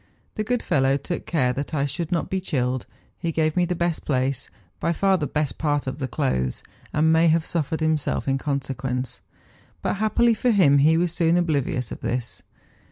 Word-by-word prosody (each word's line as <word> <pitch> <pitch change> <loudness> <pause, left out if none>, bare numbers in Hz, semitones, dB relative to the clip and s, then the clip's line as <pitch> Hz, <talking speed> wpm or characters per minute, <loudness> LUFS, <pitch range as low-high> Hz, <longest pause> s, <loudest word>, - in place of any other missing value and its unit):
The 215 - -2
good 245 +2 -1
fellow 135 0 +2
took 170 +5 -5
care 130 -7 +1
that 140 +4 -4
I 140 -1 +1
should 150 +4 -3
not 170 - 0
be 190 0 -2
chilled; 130 -7 -1 0.3
he 170 - -1
gave 155 -1 +1
me 180 -1 +3
the 180 +1 -2
best 170 -1 -1
place, 130 -2 -1 0.3
by 170 - +1
far 195 +3 +3
the 155 -5 -1
best 150 -2 -2
part 145 -2 0
of 130 +2 -4
the 130 - -2
clothes, 90 - -1 0.3
and 160 +1 +3
may 165 +1 +5
have 160 0 +3
suffered 160 -1 -2
himself 155 -3 0
in 135 0 +1
con¬ 140 -1 -1
sequence; 130 -1 -4 0.6
but - - 0
happily 225 +3 +3
for 245 +3 0
him 165 -11 +5
he 155 +3 +5
was 170 -1 +1
soon 170 0 +3
oblivious 140 -8 0
of - - -6
this. 120 -1 -3
155 Hz, 200 wpm, -24 LUFS, 135-170 Hz, 0.6 s, may